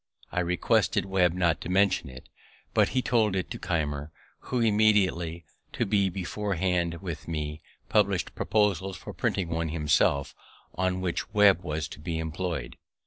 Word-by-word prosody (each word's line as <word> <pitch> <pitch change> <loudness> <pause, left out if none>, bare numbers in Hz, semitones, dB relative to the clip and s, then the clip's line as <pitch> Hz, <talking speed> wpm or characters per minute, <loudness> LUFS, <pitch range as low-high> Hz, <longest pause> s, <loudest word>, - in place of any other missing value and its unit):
I - - -1
requested 90 +1 +1
Webb 95 -3 +2
not 85 -5 +1
to - - -6
mention 95 -5 +2
it; 65 0 -12 0.5
but - - +4
he 130 - 0
told 110 -5 +2
it 95 - -2
to - - -5
Keimer, 75 -4 -2 0.3
who 125 - -1
immediately, 105 -7 +2 0.3
to - - 0
be 100 -1 +2
beforehand 90 -2 -1
with 80 -5 -6
me, 75 -1 -4 0.3
published 100 -4 +1
proposals 95 -3 0
for - - -9
printing 90 -3 -1
one 80 0 -1
himself, 75 -3 +1 0.4
on 95 0 -1
which 90 +2 -2
Webb 100 -4 +6
was 75 -3 -3
to - - -10
be 80 +1 -3
employ'd. 80 -3 -4
90 Hz, 150 wpm, -27 LUFS, 80-95 Hz, 0.5 s, Webb